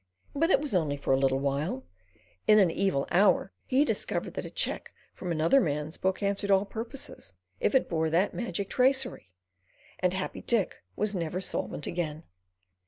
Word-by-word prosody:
But 325 +4 +2
it 275 - +5
was 290 -4 -4
only 155 -6 +1
for 140 - 0
a 130 - +3
little 135 -1 +3
while. 140 +1 -1 0.6
In 215 -1 +7
an 190 -5 +5
evil 175 -7 0
hour 190 +1 +4 0.2
he 270 +3 +4
discovered - - -2
that - - -4
a - - -6
cheque - - -2 0.2
from 180 - -5
another 165 - +4
man's 150 0 -2
book 190 +2 0
answered 200 0 0
all 195 0 +4
purposes 225 - -6 0.3
if - - +1
it 265 - +4
bore 160 -2 0
that 175 +5 +2
magic 200 -4 -3
tracery, 255 - +1 0.7
and 180 0 +1
Happy 190 - -4
Dick 225 -7 0 0.2
was 210 0 0
never 175 -1 -2
solvent 180 -5 -3
again. 160 -2 -3
185 Hz, 170 wpm, -29 LUFS, 155-215 Hz, 0.7 s, In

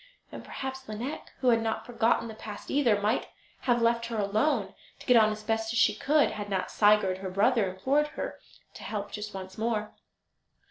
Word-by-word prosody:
And - - -8
perhaps 265 0 -6
Lineik, 240 +8 -5
who 255 - +4
had 230 -1 +4
not 225 0 -2
forgotten 230 -1 +1
the 225 - -7
past 215 -1 -8
either, 245 -8 +3
might 210 +4 0 0.3
have 240 -2 +1
left 235 0 +2
her 230 -1 -4
alone, 215 +2 +1 0.2
to - - -14
get 250 - +5
on 215 -2 +6
as 215 0 -6
best 225 +1 -1
she 230 - +4
could, 300 +1 +2
had 205 -1 -6
not 190 -2 -2
Sigurd, 205 -3 +3
her 190 -1 -5
brother, 205 +2 +2
implored 270 +11 +1
her - - -4 0.3
to - - -11
help 205 -2 -4
just 210 0 -6
once 190 +1 -8
more. 220 -2 -1
220 Hz, 190 wpm, -28 LUFS, 205-240 Hz, 0.3 s, on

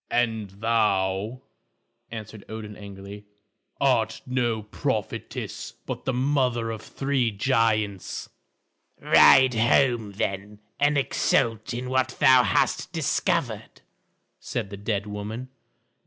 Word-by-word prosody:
"And 110 -4 0
thou," 105 +2 0 0.7
answered 110 -2 -8
Odin 110 -1 -7
angrily, 100 0 -10 0.5
"art 110 -5 +1
no 120 -4 -1
prophetess, 105 - -4
but - - -5
the 130 - 0
mother 125 -3 +1
of 110 - -6
three 135 -3 -1
giants." 110 -3 0 0.7
"Ride 130 -1 +6
home, 115 -2 +2
then, 100 0 -3 0.2
and 145 0 +3
exult 115 -4 +1
in 125 +2 -4
what 130 0 0
thou 130 -1 +7
hast - - +1
discovered," - - -1 0.6
said 100 - -4
the - - -5
dead 100 0 -2
woman. 105 +5 -6
110 Hz, 105 wpm, -25 LUFS, 105-125 Hz, 0.7 s, thou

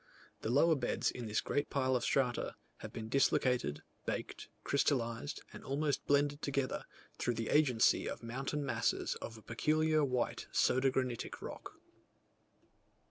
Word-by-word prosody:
The - - -2
lower 145 +7 +5
beds 140 - 0
in 120 -2 -6
this 105 0 +1
great 145 - -1
pile 130 -2 +1
of 120 - 0
strata, 125 -2 +1 0.2
have - - -8
been 110 -1 -6
dislocated, 125 - +2 0.2
baked, - - -4
crystallized 135 0 0
and - - -9
almost 145 +1 -1
blended 145 +1 +2
together, 140 -2 -1 0.3
through 120 - 0
the 115 0 -3
agency 130 -7 +4
of - - -6
mountain 135 +5 -3
masses 120 -3 0
of 115 - -6
a 110 - -14
peculiar 155 +6 +2
white 125 -3 -1
soda 130 +1 +3
granitic 130 -2 -2
rock. - - -8
130 Hz, 140 wpm, -34 LUFS, 120-145 Hz, 0.3 s, lower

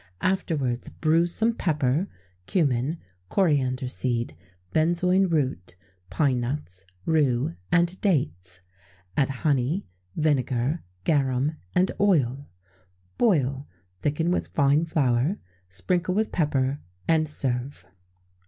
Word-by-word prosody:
Afterwards 145 -10 0
bruise 165 +2 +2
some 225 +5 +2
pepper, 150 - 0 0.4
cummin, 145 -2 +1 0.3
coriander 135 -8 +1
seed, 120 -8 -1 0.4
benzoin 180 +4 +3
root, 130 - -1 0.3
pine 130 - +1
nuts, 120 -8 -5 0.2
rue, 135 - +2 0.2
and 175 +1 +2
dates; 90 - -1 0.5
add 140 -2 +2
honey, 140 +5 0 0.3
vinegar, 140 -1 +1 0.2
garum, 140 0 +1 0.2
and 185 +1 +3
oil; 140 -9 +2 0.7
boil, 140 - +2 0.3
thicken 160 +4 0
with - - 0
fine 145 +2 +3
flour, 140 - +1 0.3
sprinkle 175 - 0
with 220 +1 +1
pepper, 145 -3 0 0.3
and 160 -2 +3
serve. 130 -1 -2
145 Hz, 95 wpm, -26 LUFS, 125-170 Hz, 0.7 s, benzoin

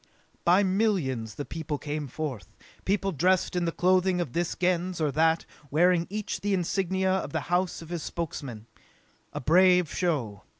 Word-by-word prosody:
By 180 +4 +5
millions 185 - 0
the 145 - -5
people 155 -2 -4
came 150 0 -4
forth. 135 -4 -6 0.3
People 195 0 +1
dressed 185 +3 +1
in 175 -1 +1
the 165 - 0
clothing 185 +1 +2
of 165 -8 -3
this 175 0 -1
Gens 180 0 0
or 155 -2 +1
that, 160 +3 +2 0.2
wearing 170 +3 +3
each 210 +1 -4
the 200 -1 +1
insignia 190 +1 0
of 190 - -2
the 160 - 0
house 180 -1 0
of 165 - -13
his 175 -2 -3
Spokesman. 140 -10 -5 0.7
A - - -4
brave 180 +3 +4
show. 135 - -1
175 Hz, 165 wpm, -27 LUFS, 150-185 Hz, 0.7 s, By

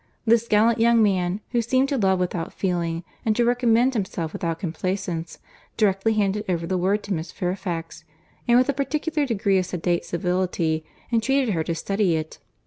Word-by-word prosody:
This 230 0 +3
gallant 225 +2 +3
young 230 0 +5
man, 190 -1 +1
who 240 -1 +2
seemed 260 +4 +2
to 285 - 0
love 190 -2 +3
without 180 -2 -2
feeling, 170 -3 -2 0.2
and 220 -1 +1
to 240 - +2
recommend 245 +1 +3
himself 190 -7 -3
without 165 -2 -2
complaisance, 175 0 -3 0.4
directly 210 0 +2
handed 210 -1 0
over 170 -2 0
the 185 - -1
word 195 +4 +1
to 200 - -3
Miss 160 -1 -4
Fairfax, 175 -3 -4 0.4
and 240 0 +5
with 255 - +4
a 280 - +1
particular 295 +2 -1
degree 200 -4 +2
of 180 - -2
sedate 175 -1 -1
civility 175 -2 -1 0.3
entreated 240 +1 +2
her 160 -2 0
to 165 - -2
study 195 0 0
it. 155 0 -5
195 Hz, 175 wpm, -24 LUFS, 175-230 Hz, 0.4 s, young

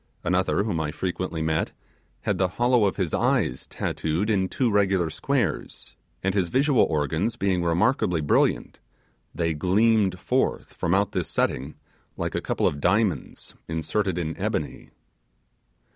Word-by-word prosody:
Another 90 +3 +1
whom 100 -7 -1
I 80 -2 -1
frequently 90 0 -3
met 80 0 -1 0.5
had 100 -3 -1
the 95 - +3
hollow 120 -2 +4
of 100 - 0
his 90 -5 -1
eyes 65 - +1
tattooed 85 +8 -2
in 95 -3 +1
two 125 -4 0
regular 95 -5 +2
squares 110 - -2 0.3
and 95 0 +1
his 95 -3 +1
visual 135 - +3
organs 80 - -1
being 95 -2 0
remarkably 85 - +2
brilliant, 75 - +1 0.6
they 85 -1 0
gleamed 95 +3 +2
forth 125 +7 -1
from 85 +2 0
out 100 +1 +1
this - - -2
setting 70 +4 -1 0.4
like - - -3
a - - -1
couple - - -1
of 70 - 0
diamonds 90 - 0
inserted 80 +4 -1
in 80 -2 -2
ebony. - - -3
95 Hz, 145 wpm, -25 LUFS, 80-105 Hz, 0.6 s, hollow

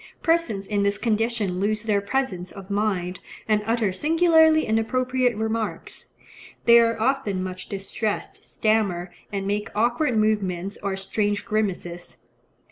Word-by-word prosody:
Persons 330 - +1
in 205 0 0
this 200 0 +1
condition 220 -4 0
lose 215 +2 0
their 210 -2 +1
presence 200 -6 -2
of 195 0 -10
mind, 190 -3 -1 0.3
and 215 -1 +2
utter 225 -4 +1
singularly 320 - +4
inappropriate 250 +2 +1
remarks. 220 0 -3 0.6
They 235 0 +8
are 230 -1 +2
often 220 -6 0
much 185 -1 -6
distressed, 200 +2 -3
stammer, 200 -5 0 0.2
and 195 -1 -3
make 205 +1 -1
awkward 240 +3 +1
movements 200 -3 0
or 195 -1 -2
strange 205 +1 -1
grimaces. 180 -5 -3
215 Hz, 125 wpm, -24 LUFS, 195-235 Hz, 0.6 s, They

